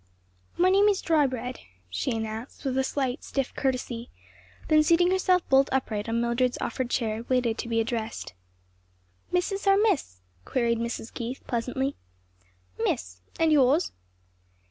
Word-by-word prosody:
"My 365 Hz, +2 st, +4 dB
name 400 Hz, +2 st, +5 dB
is 400 Hz, -2 st, +3 dB
Drybread," 260 Hz, -6 st, 0 dB, 0.3 s
she 90 Hz, 0 st, -2 dB
announced 225 Hz, +4 st, -4 dB
with 260 Hz, -1 st, 0 dB
a 265 Hz, -, +2 dB
slight, 265 Hz, 0 st, -2 dB
stiff 270 Hz, -2 st, -2 dB
courtesy; 250 Hz, -3 st, -2 dB, 0.6 s
then 310 Hz, -1 st, +5 dB
seating 340 Hz, +3 st, +4 dB
herself 370 Hz, -1 st, +2 dB
bolt 270 Hz, +1 st, +4 dB
upright 225 Hz, -5 st, -1 dB
on 230 Hz, +1 st, +1 dB
Mildred's 235 Hz, +1 st, +1 dB
offered 260 Hz, -2 st, -2 dB
chair, 225 Hz, -3 st, -1 dB
waited 245 Hz, -3 st, +1 dB
to 235 Hz, -, -4 dB
be 225 Hz, -1 st, +1 dB
addressed. 225 Hz, -, -3 dB, 1.0 s
"Mrs. 390 Hz, +3 st, -1 dB
or 390 Hz, 0 st, +6 dB
Miss?" 365 Hz, -, +1 dB, 0.2 s
queried 235 Hz, -, 0 dB
Mrs. 235 Hz, -1 st, -4 dB
Keith 240 Hz, +2 st, -5 dB
pleasantly. 260 Hz, +3 st, -2 dB, 0.9 s
"Miss. 90 Hz, 0 st, -2 dB, 0.2 s
And 325 Hz, -1 st, +4 dB
yours?" 290 Hz, +3 st, +4 dB
255 Hz, 140 wpm, -27 LUFS, 230-310 Hz, 1.0 s, or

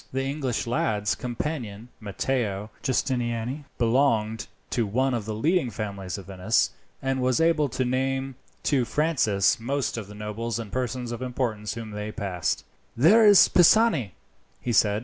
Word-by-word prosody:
The 135 Hz, +1 st, -1 dB
English 135 Hz, -3 st, -2 dB
lad's 105 Hz, -3 st, 0 dB
companion 120 Hz, -4 st, -5 dB
Matteo 105 Hz, -1 st, -2 dB
Giustiniani 125 Hz, +1 st, -1 dB
belonged 115 Hz, -3 st, +1 dB, 0.2 s
to 115 Hz, -4 st, 0 dB
one 130 Hz, +6 st, +1 dB
of 115 Hz, -4 st, -2 dB
the 110 Hz, 0 st, -4 dB
leading 155 Hz, -, +1 dB
families 100 Hz, -3 st, -5 dB
of 100 Hz, -, -9 dB
Venice, 95 Hz, +4 st, +1 dB, 0.3 s
and 135 Hz, -1 st, 0 dB
was 125 Hz, -1 st, +2 dB
able 165 Hz, -3 st, +3 dB
to 130 Hz, +2 st, -1 dB
name 135 Hz, +1 st, -1 dB, 0.3 s
to 135 Hz, -4 st, +2 dB
Francis 120 Hz, -, +1 dB
most 130 Hz, +2 st, -2 dB
of 110 Hz, -4 st, -5 dB
the 105 Hz, -, -11 dB
nobles 105 Hz, +2 st, -4 dB
and 110 Hz, -4 st, -6 dB
persons 125 Hz, -1 st, -3 dB
of 120 Hz, -, -5 dB
importance 120 Hz, -5 st, -2 dB
whom 115 Hz, -2 st, -7 dB
they 105 Hz, +1 st, -5 dB
passed. 95 Hz, -6 st, -2 dB, 0.3 s
"There 210 Hz, -, +6 dB
is 205 Hz, -2 st, +8 dB
Pisani," 175 Hz, -, +4 dB, 0.5 s
he 120 Hz, -, -2 dB
said. 105 Hz, -1 st, +3 dB
120 Hz, 150 wpm, -26 LUFS, 105-135 Hz, 0.5 s, is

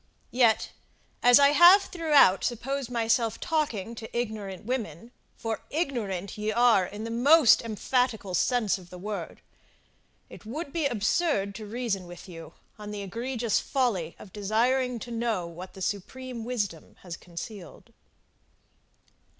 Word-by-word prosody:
Yet, 240 Hz, -3 st, +3 dB, 0.5 s
as 245 Hz, 0 st, +7 dB
I 280 Hz, 0 st, +6 dB
have 350 Hz, +6 st, +8 dB
throughout 300 Hz, -, +4 dB
supposed 260 Hz, +2 st, -2 dB
myself 230 Hz, -1 st, 0 dB
talking 240 Hz, -, -2 dB
to 225 Hz, +1 st, -7 dB
ignorant 210 Hz, -5 st, -4 dB
women, 230 Hz, -, -4 dB, 0.3 s
for 225 Hz, -1 st, -4 dB
ignorant 215 Hz, -, -3 dB
ye 210 Hz, +1 st, -1 dB
are 230 Hz, -5 st, +4 dB
in 210 Hz, +2 st, -8 dB
the 230 Hz, -, -5 dB
most 270 Hz, +3 st, +6 dB
emphatical 230 Hz, -2 st, -1 dB
sense 215 Hz, 0 st, +1 dB
of 175 Hz, -1 st, -15 dB
the 180 Hz, -, -10 dB
word, 205 Hz, +3 st, -6 dB, 0.9 s
it -, -, -13 dB
would 280 Hz, +7 st, -6 dB
be 320 Hz, -4 st, +1 dB
absurd 220 Hz, -, 0 dB
to 210 Hz, +2 st, -8 dB
reason 215 Hz, -5 st, -3 dB
with 175 Hz, +2 st, -11 dB
you 165 Hz, -3 st, -11 dB, 0.2 s
on 210 Hz, 0 st, -8 dB
the 205 Hz, -1 st, -5 dB
egregious 235 Hz, +3 st, -1 dB
folly 215 Hz, -, -1 dB
of 190 Hz, -, -14 dB
desiring 240 Hz, +5 st, +1 dB
to 240 Hz, +1 st, -8 dB
know 230 Hz, -6 st, -1 dB
what 170 Hz, +2 st, -9 dB
the 190 Hz, -, -6 dB
Supreme 235 Hz, +4 st, -5 dB
Wisdom 205 Hz, -10 st, -4 dB
has 175 Hz, -2 st, -6 dB
concealed. 180 Hz, +3 st, -10 dB
225 Hz, 140 wpm, -27 LUFS, 195-250 Hz, 0.9 s, have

